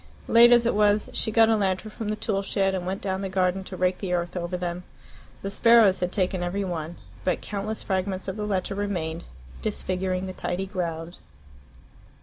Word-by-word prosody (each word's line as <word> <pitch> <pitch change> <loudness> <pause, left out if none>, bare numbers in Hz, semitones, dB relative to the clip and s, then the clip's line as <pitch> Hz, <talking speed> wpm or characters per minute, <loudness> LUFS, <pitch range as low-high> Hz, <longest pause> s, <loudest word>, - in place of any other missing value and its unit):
Late 235 +1 +7
as 240 -1 +6
it 235 - +2
was, 210 0 +2
she - - 0
got 225 0 +5
a 225 - +4
lantern 200 +1 -1
from 220 0 -6
the 215 - 0
tool 210 -2 -1
shed 195 -1 0
and 180 -1 -3
went 190 +2 -3
down 190 -1 -1
the 195 - -3
garden 185 0 +1
to 185 - -8
rake 180 0 +1
the 185 -3 -2
earth 175 0 -1
over 175 0 -2
them. 175 0 -4 0.6
The 195 - -3
sparrows 230 -4 +5
had 180 0 -1
taken 185 -2 0
every 180 +3 -1
one. 170 -3 -4 0.3
But 180 - 0
countless 210 +2 -4
fragments 190 0 -2
of 190 - -3
the 210 -1 -3
letter 195 -1 -1
remained, 175 -5 -3 0.4
disfiguring 185 - -2
the 185 - -5
tidy 185 +1 -3
ground. 170 -3 -4
190 Hz, 195 wpm, -26 LUFS, 180-205 Hz, 0.6 s, Late